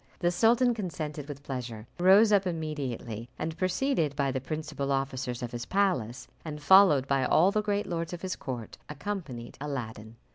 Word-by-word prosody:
The 175 -1 +1
sultan 235 +6 +4
consented 155 -8 -5
with 145 -1 -8
pleasure, 120 -5 -5
rose 195 +5 +6
up 200 -2 +4
immediately, 135 -9 -4
and, 160 0 -3
preceded 185 - 0
by 140 -1 +1
the 130 - -2
principal 150 -1 -4
officers 130 -3 -2
of 120 - -4
his 120 -1 -5
palace, 180 - 0 0.2
and 150 -2 -6
followed 150 -5 +6
by 135 -1 +2
all 170 +8 +4
the 215 - +1
great 205 -1 -1
lords 165 -1 -3
of 175 0 -7
his 185 -1 -2
court, 120 -4 -7
accompanied 150 -7 -6
Aladdin. 115 -6 -5
150 Hz, 170 wpm, -29 LUFS, 130-185 Hz, 0.2 s, rose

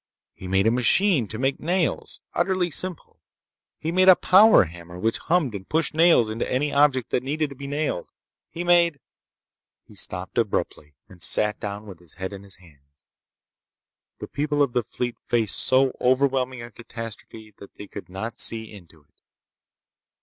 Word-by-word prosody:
He 95 - -10
made 95 +2 +2
a 110 - +4
machine 125 - +3
to 110 - -6
make 135 +3 -1
nails—utterly 180 +1 -1
simple. 180 +3 -4 0.6
He 160 - -3
made 185 +2 +5
a 185 - +10
power 205 - +6
hammer 85 +1 -10
which 115 +5 -1
hummed 165 -8 0
and 95 -2 -8
pushed 160 -1 0
nails 160 -7 +5
into 110 +2 -4
any 145 +3 0
object 140 -4 +2
that - - +1
needed 150 +2 -2
to - - -9
be 140 +1 -8
nailed. 145 - -3 0.4
He 175 - -5
made— 170 -4 +3 0.8
He - - -19
stopped - - -3
abruptly, 75 -1 -2
and 90 -3 -17
sat 105 +7 +1
down 105 +1 -6
with 95 -5 -11
his 85 -3 -13
head 95 +1 -5
in 100 - -8
his 100 -1 -11
hands. 70 -5 -23 1.1
The - - -7
people 145 0 0
of 130 -4 -2
the 125 - +2
fleet 120 +1 -5
faced 115 -4 +1
so 130 0 +2
overwhelming 130 -1 +1
a 120 - -10
catastrophe 115 -1 -9
that 100 - -14
they 105 - -9
could 100 -3 -10
not 110 +5 -6
see 110 -1 0
into 85 -6 -15
it. - - -42
120 Hz, 170 wpm, -24 LUFS, 100-150 Hz, 1.1 s, a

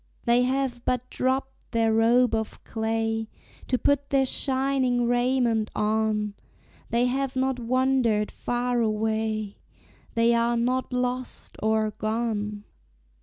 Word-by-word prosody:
They 240 0 +4
have 255 -1 -1
but 250 0 -1
dropped 265 +1 -2
their 225 -1 +2
robe 235 +2 +4
of 220 -1 -3
clay 225 0 -2 0.4
To 255 - +1
put 280 +3 +1
their 270 -1 +3
shining 260 -2 +1
raiment 245 -2 +1
on; 210 -1 0 0.6
They 235 +1 +2
have 265 +1 -1
not 260 -1 0
wandered 245 -3 +1
far 245 0 -1
away 220 -1 -1 0.6
They 230 +1 +4
are 235 0 +2
not 255 +3 0
"lost" 250 0 -3
or 220 0 +1
"gone." 215 -1 -2
235 Hz, 120 wpm, -26 LUFS, 220-255 Hz, 0.6 s, They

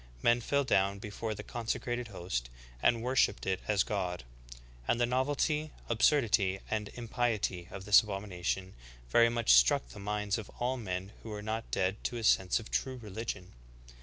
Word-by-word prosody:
Men 120 +1 +4
fell 140 +4 +1
down 100 -5 +2
before 105 +2 -4
the - - -7
consecrated 120 +1 -3
host, 85 - -4 0.3
and 115 -1 +3
worshiped 125 -5 +2
it 95 -1 0
as 105 -3 +3
God; 90 - -2 0.6
and 120 - +2
the 120 - +4
novelty, 145 +5 0 0.2
absurdity, 110 -5 +3
and 105 -1 -1
impiety 115 -7 -1
of 95 -1 -8
this 105 0 +8
abomination 95 -2 -3 0.4
very 115 0 +6
much 115 - +3
struck - - +5
the 60 - -11
minds 105 +1 -1
of 110 - -8
all 125 +2 0
men 95 -3 -4
who 115 - -9
were 105 -1 -5
not 110 +1 -3
dead 95 +2 -1
to 120 - -1
a 115 - -5
sense 95 -3 +3
of 115 - -11
true 130 -1 -1
religion."' 105 -4 -6
105 Hz, 165 wpm, -32 LUFS, 95-120 Hz, 0.6 s, this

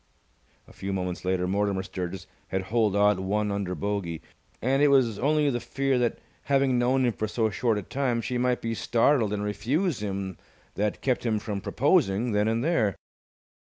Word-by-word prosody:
A - - -16
few 95 0 -4
moments 90 -1 -3
later 90 -1 0
Mortimer 100 0 0
Sturgis 95 -1 -5 0.2
had 95 0 -2
holed 110 -4 +3
out 105 -1 +4
one 105 +2 0
under 100 -2 -2
bogey, 90 -2 -3 0.4
and 135 +3 +1
it 145 - +6
was 130 -7 +3
only 150 +2 +2
the 120 - -1
fear 135 +2 0
that, 120 -1 0 0.3
having 135 -2 +2
known 130 +2 +2
him 120 - +1
for 110 +2 -2
so 110 0 0
short 110 +3 +1
a 105 - -3
time, 130 +1 -1
she 125 +1 -2
might 125 0 0
be 115 0 -1
startled 115 0 +2
and 105 -1 -2
refuse 120 - -1
him 95 -2 -4 0.3
that 105 +1 -2
kept 130 -2 0
him 115 -3 +1
from 105 -1 -4
proposing 120 - +2
then 105 0 +2
and 115 +2 0
there. 115 - +1
110 Hz, 185 wpm, -27 LUFS, 100-125 Hz, 0.4 s, it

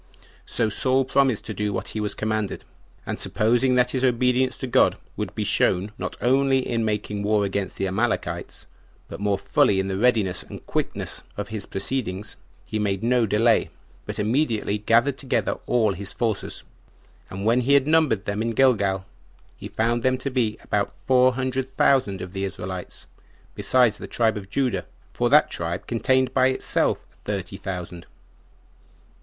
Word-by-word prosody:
15 - - -26
2. - - -25 0.2
So 110 - +2
Saul 130 +5 +2
promised 130 -4 +2
to 110 - -4
do 105 +1 -2
what 95 +1 -4
he 110 - -4
was 105 -1 -2
commanded; 110 -2 -2 0.4
and - - -4
supposing 120 +4 +2
that 125 0 +3
his 130 -1 -1
obedience 125 +1 +2
to - - -4
God 125 - +3 0.2
would - - -4
be - - -1
shown, 95 +4 +1
not - - -4
only 135 +1 +2
in 115 -2 0
making 105 -1 -2
war 105 0 +2
against 100 -1 -3
the 95 - -1
Amalekites, 110 +5 -2 0.4
but - - -8
more 100 -1 +1
fully 100 0 +2
in 95 0 -1
the 95 0 -2
readiness 105 -7 +2
and - - -10
quickness - - -3 0.2
of 100 -1 -4
his 110 -2 -4
proceedings, 105 -3 -2 0.3
he 110 - -3
made 100 -1 -1
no 120 -1 +2
delay, 110 +3 +3 0.4
but - - -5
immediately 110 -2 0
gathered 120 +6 +2
together 135 - -1
all 110 -5 +2
his 100 +1 -5
forces; 110 -4 -3 0.7
and 95 +2 -6
when 120 +3 +3
he 140 +3 +3
had 140 -1 +4
numbered 150 -10 +2
them 100 +1 -2
in 115 +1 -1
Gilgal, 100 -7 +2 0.5
he - - -8
found 120 +2 0
them 130 +1 +2
to 135 +2 -4
be 115 -4 0
about 100 -1 -1
four 130 0 +3
hundred 130 0 -2
thousand 130 -7 +2
of 90 0 -9
the 95 0 -3
Israelites, 95 -1 -6 0.5
besides 125 -4 +2
the - - -7
tribe 115 -2 +1
of 100 -2 -7
Judah, 130 +2 -1 0.3
for - - +1
that - - +5
tribe 85 +1 -3
contained 130 +2 +1
by 130 -1 +4
itself 130 - 0 0.2
thirty 100 -2 -4
thousand. 90 -3 -6
110 Hz, 170 wpm, -24 LUFS, 100-130 Hz, 0.7 s, that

